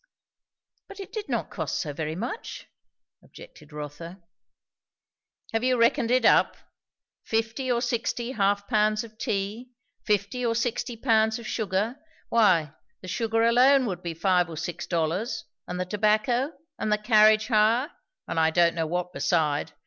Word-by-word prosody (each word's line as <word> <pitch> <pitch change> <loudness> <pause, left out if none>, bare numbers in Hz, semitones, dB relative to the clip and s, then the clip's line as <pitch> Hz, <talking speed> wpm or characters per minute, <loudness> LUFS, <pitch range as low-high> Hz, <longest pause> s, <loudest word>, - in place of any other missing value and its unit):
"But 400 - -12
it 390 - -9
did 430 -2 -5
not - - -2
cost - - -3
so 150 -4 -3
very 155 +2 -4
much," 240 - -6 0.6
objected 160 - -15
Rotha. 150 +5 -8 1.3
"Have 225 +1 0
you 255 0 +2
reckoned 235 +1 +2
it 250 -1 +3
up? - - +4 0.7
Fifty 225 +4 -1
or 240 0 +1
sixty 240 0 -2
half 200 -3 0
pounds 215 -1 +2
of 220 -1 -14
tea, 220 +2 -3 0.3
fifty 210 +4 -1
or 230 -1 +1
sixty 240 +1 -2
pounds 220 -1 +2
of 235 - -10
sugar, 215 +3 -2 0.3
why, 175 -10 +3 0.3
the 185 - -10
sugar 225 +4 0
alone 255 +3 +5
would 185 -5 -4
be 170 -2 -5
five 180 0 +2
or 160 - -8
six 175 +1 -5
dollars; 185 +7 -2 0.2
and 180 0 -5
the 180 - -1
tobacco, 215 - +1 0.3
and 215 - -1
the 210 - +3
carriage 215 0 +4
hire; 230 +6 +3 0.4
and 165 - -1
I 160 0 +4
don't 170 +1 +3
know 165 -1 -2
what 180 +2 -3
beside. 155 -4 0
215 Hz, 155 wpm, -26 LUFS, 180-235 Hz, 1.3 s, alone